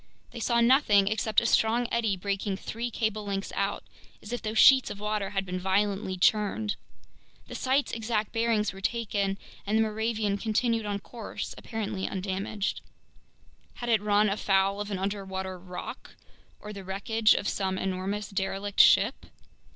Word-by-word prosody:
They 235 Hz, -, -8 dB
saw 235 Hz, +1 st, +2 dB
nothing 235 Hz, -5 st, +5 dB
except 215 Hz, 0 st, +2 dB
a -, -, -3 dB
strong 230 Hz, +1 st, +3 dB
eddy 225 Hz, -4 st, +1 dB
breaking 200 Hz, +1 st, -2 dB
three 230 Hz, +4 st, -4 dB
cable 220 Hz, -2 st, -2 dB
lengths 195 Hz, -1 st, -3 dB
out, 200 Hz, 0 st, -1 dB, 0.4 s
as 210 Hz, -, -8 dB
if 245 Hz, -, -3 dB
those 215 Hz, 0 st, -3 dB
sheets 265 Hz, +2 st, +7 dB
of 200 Hz, -, -7 dB
water 210 Hz, -1 st, -2 dB
had 195 Hz, -1 st, -2 dB
been 185 Hz, 0 st, -3 dB
violently 195 Hz, 0 st, 0 dB
churned. 210 Hz, +2 st, +2 dB, 0.7 s
The -, -, -10 dB
site's 265 Hz, +2 st, +1 dB
exact 220 Hz, -2 st, -2 dB
bearings 225 Hz, -3 st, +1 dB
were 195 Hz, -, -11 dB
taken, 200 Hz, -3 st, -1 dB, 0.3 s
and 210 Hz, +2 st, 0 dB
the 225 Hz, -, +4 dB
Moravian 215 Hz, -2 st, -1 dB
continued 225 Hz, 0 st, 0 dB
on 205 Hz, -1 st, -1 dB
course 230 Hz, +1 st, -7 dB
apparently 210 Hz, -4 st, -4 dB
undamaged. 195 Hz, +2 st, -3 dB, 0.9 s
Had 240 Hz, -, -5 dB
it 220 Hz, -3 st, +3 dB
run 210 Hz, 0 st, +3 dB
afoul 195 Hz, 0 st, +1 dB
of 205 Hz, -, -4 dB
an 200 Hz, -, -2 dB
underwater 190 Hz, -1 st, -4 dB
rock 180 Hz, 0 st, -8 dB, 0.4 s
or 210 Hz, 0 st, -8 dB
the 200 Hz, -1 st, -8 dB
wreckage 215 Hz, +3 st, +2 dB
of -, -, -1 dB
some 190 Hz, -1 st, -1 dB
enormous 190 Hz, +2 st, -2 dB
derelict 195 Hz, +1 st, -3 dB
ship? -, -, +5 dB
205 Hz, 160 wpm, -28 LUFS, 195-220 Hz, 0.9 s, sheets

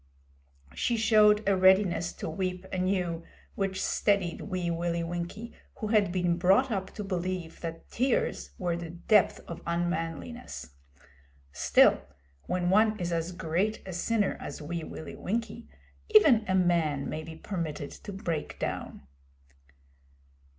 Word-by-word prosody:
She 235 Hz, -, 0 dB
showed 215 Hz, -2 st, +5 dB
a 200 Hz, -, +4 dB
readiness 185 Hz, -2 st, +4 dB
to -, -, -6 dB
weep 185 Hz, +2 st, -3 dB
anew, 180 Hz, -2 st, 0 dB, 0.3 s
which 195 Hz, -1 st, -2 dB
steadied 200 Hz, -5 st, +1 dB
Wee 180 Hz, -4 st, -2 dB
Willie 170 Hz, 0 st, -1 dB
Winkie, 175 Hz, +7 st, -5 dB, 0.2 s
who 215 Hz, -, -4 dB
had 210 Hz, -4 st, +3 dB
been 175 Hz, -2 st, +1 dB
brought 195 Hz, +9 st, +4 dB
up 190 Hz, -2 st, -2 dB
to 210 Hz, -, -4 dB
believe 185 Hz, -3 st, -3 dB
that 165 Hz, -1 st, -6 dB
tears 250 Hz, 0 st, 0 dB
were 175 Hz, -3 st, -1 dB
the 170 Hz, -1 st, -6 dB
depth 180 Hz, +4 st, +2 dB
of 170 Hz, -, -7 dB
unmanliness. 170 Hz, -, -3 dB, 0.8 s
Still, -, -, +4 dB, 0.5 s
when 180 Hz, 0 st, 0 dB
one 215 Hz, +2 st, +4 dB
is 175 Hz, -1 st, -2 dB
as 165 Hz, +1 st, -1 dB
great 185 Hz, +4 st, -1 dB
a 185 Hz, -, -5 dB
sinner 205 Hz, +4 st, 0 dB
as 145 Hz, -, -7 dB
Wee 165 Hz, +2 st, -4 dB
Willie 160 Hz, -, -8 dB
Winkie, 230 Hz, +3 st, -4 dB, 0.4 s
even 305 Hz, -, +6 dB
a 190 Hz, -, +1 dB
man 170 Hz, -6 st, +2 dB
may 155 Hz, -, -4 dB
be 160 Hz, +1 st, -9 dB
permitted 160 Hz, -5 st, -4 dB
to 205 Hz, -, -9 dB
break 175 Hz, -6 st, -4 dB
down. -, -, -4 dB
180 Hz, 135 wpm, -29 LUFS, 170-210 Hz, 0.8 s, even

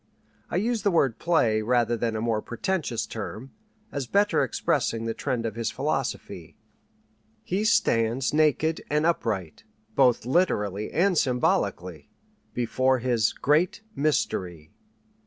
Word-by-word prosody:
I -, -, -4 dB
use 225 Hz, +4 st, 0 dB
the 205 Hz, -, +2 dB
word 135 Hz, -, +1 dB
"play" 120 Hz, -11 st, +2 dB
rather 120 Hz, +1 st, +1 dB
than 115 Hz, 0 st, -2 dB
a 110 Hz, -, -2 dB
more 115 Hz, -2 st, 0 dB
pretentious 145 Hz, -, -2 dB
term, 115 Hz, +4 st, -7 dB, 0.4 s
as 140 Hz, -3 st, -4 dB
better 205 Hz, +6 st, +2 dB
expressing 115 Hz, 0 st, -1 dB
the 115 Hz, -, -1 dB
trend 125 Hz, -3 st, -2 dB
of 110 Hz, -, -2 dB
his 115 Hz, 0 st, -2 dB
philosophy. 135 Hz, +2 st, -4 dB, 0.9 s
He 195 Hz, +4 st, -1 dB
stands 120 Hz, -, +2 dB
naked 155 Hz, +1 st, +2 dB
and 150 Hz, +1 st, +1 dB
upright, 105 Hz, -, -1 dB, 0.3 s
both 125 Hz, -4 st, +3 dB
literally 105 Hz, -, 0 dB
and 185 Hz, +2 st, +2 dB
symbolically, 90 Hz, -, -1 dB, 0.4 s
before 130 Hz, +2 st, +1 dB
his 120 Hz, -3 st, +1 dB
"Great 155 Hz, +9 st, +1 dB
Mystery." 90 Hz, -, -1 dB
125 Hz, 125 wpm, -26 LUFS, 110-155 Hz, 0.9 s, both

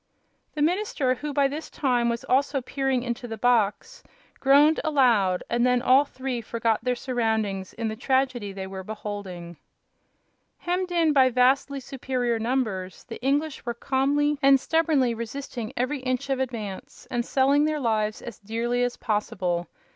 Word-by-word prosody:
The 295 Hz, -, +1 dB
minister, 330 Hz, -6 st, +1 dB
who 290 Hz, +4 st, -5 dB
by 280 Hz, -1 st, +3 dB
this 300 Hz, +3 st, -6 dB
time 245 Hz, -4 st, +1 dB
was 235 Hz, 0 st, -2 dB
also 275 Hz, +2 st, +1 dB
peering 265 Hz, -1 st, -1 dB
into 245 Hz, 0 st, -4 dB
the 225 Hz, -1 st, -6 dB
box, 245 Hz, -, +1 dB, 0.4 s
groaned 285 Hz, +3 st, +5 dB
aloud, 235 Hz, -, +3 dB
and 235 Hz, 0 st, 0 dB
then 250 Hz, 0 st, +3 dB
all 260 Hz, +3 st, +5 dB
three 260 Hz, -3 st, -4 dB
forgot 230 Hz, -1 st, -1 dB
their 250 Hz, 0 st, +1 dB
surroundings 220 Hz, -6 st, -2 dB
in 230 Hz, -1 st, -3 dB
the 220 Hz, -, -3 dB
tragedy 255 Hz, -3 st, 0 dB
they 190 Hz, 0 st, -6 dB
were 190 Hz, 0 st, -7 dB
beholding. 190 Hz, -5 st, -7 dB, 1.0 s
Hemmed 360 Hz, +1 st, -2 dB
in 330 Hz, -3 st, +3 dB
by 265 Hz, -2 st, +5 dB
vastly 260 Hz, +3 st, +2 dB
superior 250 Hz, -3 st, -2 dB
numbers, 220 Hz, -6 st, -2 dB
the 230 Hz, -, -9 dB
English 285 Hz, +3 st, 0 dB
were 235 Hz, -1 st, -3 dB
calmly 285 Hz, +3 st, +1 dB
and 275 Hz, -1 st, +6 dB
stubbornly 300 Hz, -5 st, +2 dB
resisting 235 Hz, 0 st, -6 dB
every 255 Hz, +4 st, -1 dB
inch 255 Hz, +1 st, -2 dB
of 265 Hz, -, 0 dB
advance 225 Hz, -7 st, -5 dB
and 240 Hz, -1 st, 0 dB
selling 280 Hz, +4 st, +3 dB
their 310 Hz, -1 st, 0 dB
lives 215 Hz, -4 st, -1 dB
as 220 Hz, -7 st, -8 dB
dearly 230 Hz, +4 st, -2 dB
as 245 Hz, 0 st, -1 dB
possible. 180 Hz, -5 st, -1 dB
250 Hz, 155 wpm, -25 LUFS, 225-275 Hz, 1.0 s, and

